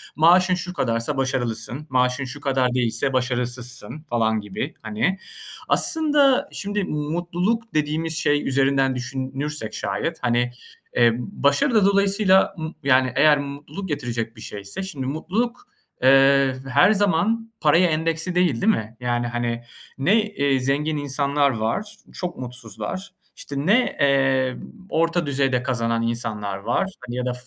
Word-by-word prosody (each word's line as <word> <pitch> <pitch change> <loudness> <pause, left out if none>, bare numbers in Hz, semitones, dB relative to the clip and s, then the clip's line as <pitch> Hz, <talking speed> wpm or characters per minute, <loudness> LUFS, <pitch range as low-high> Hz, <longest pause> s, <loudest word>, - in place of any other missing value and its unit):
maaşın 180 +3 +5
şu 180 0 -5
kadarsa 125 -2 -1
başarılısın, 130 +1 -3
maaşın 125 +1 +1
şu 140 +3 -8
kadar 130 -3 +1
değilse 125 +2 0
başarısızsın 125 +2 -3
falan 110 -2 +1
gibi 105 -2 -5
hani. 110 - -1 0.5
Aslında 295 -5 +5
şimdi 205 0 -3
mutluluk 175 +9 -2
dediğimiz 155 +2 -1
şey 145 -1 +1
üzerinden 135 0 +2
düşünürsek 130 -1 -4
şayet 135 - -3
hani, 120 0 +1 0.4
eee, 120 -1 +5
başarı 145 - +1
da 210 -3 +5
dolayısıyla 195 -1 +3
m 160 0 -5
yani 130 -2 +3
eğer 150 -1 +5
mutluluk 145 +6 -7
getirecek 120 -5 -3
bir 110 - -13
şeyse, 100 - -6
şimdi 145 -9 -5
mutluluk, 215 - -3 0.4
eee, 135 0 +5
her 180 +10 +5
zaman 210 +3 +1
paraya 170 +4 +4
endeksli 165 +3 -1
değil, 175 -10 +2
değil 220 +2 +4
mi? 110 - -5
Yani 120 -1 -1
hani 120 0 -3 0.3
ne, 195 +11 +3
eee, 140 -11 0
zengin 145 +4 0
insanlar 140 0 +1
var, 125 - -2 0.2
çok 180 -1 -5
mutsuzlar, 125 - -7 0.3
işte 140 - -8
ne, 245 +6 +2
eee, 135 -2 +2 0.3
orta 165 +1 +1
düzeyde 135 -3 0
kazanan 115 -3 -1
insanlar 110 -4 -3
var, 190 - -1 0.2
hani 120 - -5
ya 125 - -2
da 125 - -1
140 Hz, 135 wpm, -22 LUFS, 125-175 Hz, 0.5 s, maaşın